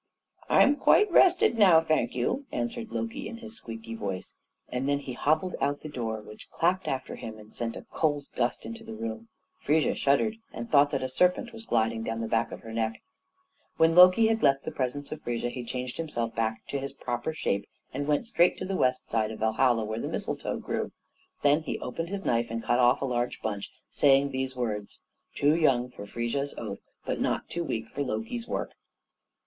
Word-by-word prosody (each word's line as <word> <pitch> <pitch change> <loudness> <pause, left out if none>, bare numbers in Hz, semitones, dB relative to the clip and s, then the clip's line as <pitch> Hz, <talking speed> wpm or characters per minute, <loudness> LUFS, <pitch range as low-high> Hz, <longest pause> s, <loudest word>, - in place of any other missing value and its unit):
"I'm 285 +1 +5
quite 420 +5 +5
rested 345 -10 +5
now, 185 -6 +8
thank 155 -7 0
you," 250 - -1
answered 235 -1 -3
Loki 235 +5 -3
in 230 - -7
his 230 -1 -8
squeaky 115 - -8
voice, 100 -4 -5 0.3
and 125 +3 -2
then 140 - +3
he 140 -2 -6
hobbled 155 +8 +1
out 140 +1 +2
at - - -27
the 155 - -7
door, 115 -5 -3
which 105 - -12
clapped 185 +3 +1
after 130 -1 -3
him, 110 -1 -7
and 105 0 -15
sent 115 -1 -3
a - - -9
cold 145 -3 0
gust 120 -1 0
into 115 0 -7
the 110 - -8
room. 110 0 -5 0.3
Frigga 155 +2 +2
shuddered, 215 +11 +2
and 235 - -6
thought 145 -7 +5
that 135 -3 -2
a - - 0
serpent 180 - +1
was 225 0 -10
gliding 115 -1 +1
down 115 0 -3
the 115 - -2
back 115 +1 +1
of - - -8
her 115 0 -9
neck. 110 0 -2 0.7
When 160 0 +5
Loki 185 +5 +8
had 225 0 +2
left 135 0 +3
the - - -3
presence 140 +2 -3
of 155 0 -6
Frigga, 120 0 -2
he 125 - -5
changed 125 +1 -4
himself 120 -8 -3
back 110 -1 -2
to 140 - -1
his 140 0 -5
proper 120 +1 -3
shape 100 -10 -2 0.2
and 140 +2 -3
went 150 +9 +1
straight 175 -6 +3
to - - -4
the 190 0 -2
west 130 -6 +1
side 110 -1 0
of 110 - -6
Valhalla, 115 +1 +2
where 110 +1 -3
the - - -3
mistletoe - - -3
grew. - - -3 0.5
Then 145 +2 +4
he 155 - -3
opened 165 +7 -4
his 200 0 -4
knife 115 0 +1
and 115 0 -4
cut 120 - +2
off 125 +2 +4
a - - +1
large 120 -1 -1
bunch, 100 -2 -3 0.2
saying 140 0 +4
these 130 0 -2
words, 105 -5 -3 0.3
"Too 145 +2 +3
young 130 -7 +3
for 100 -4 -9
Frigga's 120 +6 -2
oaths, - - -5 0.2
but - - -2
not - - -1
too 170 - -2
weak 115 -8 -3
for 145 - -4
Loki's 140 - -3
work." - - -3
130 Hz, 210 wpm, -28 LUFS, 115-160 Hz, 0.7 s, now